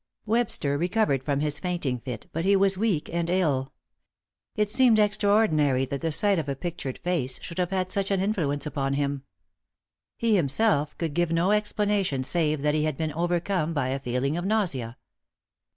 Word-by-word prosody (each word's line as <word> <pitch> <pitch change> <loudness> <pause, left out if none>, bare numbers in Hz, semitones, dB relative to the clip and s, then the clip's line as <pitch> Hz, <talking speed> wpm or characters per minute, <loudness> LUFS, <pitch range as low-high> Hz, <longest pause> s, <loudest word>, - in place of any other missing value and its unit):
Webster 210 -11 0
recovered 175 - +1
from 140 0 -1
his 150 0 0
fainting 160 -8 -2
fit, 120 -2 -7
but 165 - -2
he 200 +2 +4
was 195 0 +3
weak 190 -6 0
and 170 0 -1
ill. 150 -8 +1 0.8
It 210 -2 +1
seemed 235 +1 +4
extraordinary 205 -10 +2
that 140 +1 -5
the 165 - -1
sight 200 +3 +3
of 150 -3 -4
a 140 - -1
pictured 150 -4 -5
face 155 -8 -1
should 170 - -6
have 180 -1 0
had 185 -1 -1
such 195 -1 0
an 195 -1 +1
influence 165 -8 -1
upon 140 -2 -2
him. 140 -1 -1 1.0
He 230 -2 +2
himself 150 -2 +1
could 165 -3 -3
give 175 +1 0
no 170 +4 +2
explanation 205 -8 0
save 155 -1 0
that 150 0 +2
he 155 0 +1
had 155 -3 -2
been 155 -2 -2
overcome 175 0 -1
by 130 -3 0
a 135 +1 -2
feeling 135 +4 -1
of 175 - -3
nausea. 170 - -1
165 Hz, 180 wpm, -26 LUFS, 140-195 Hz, 1.0 s, he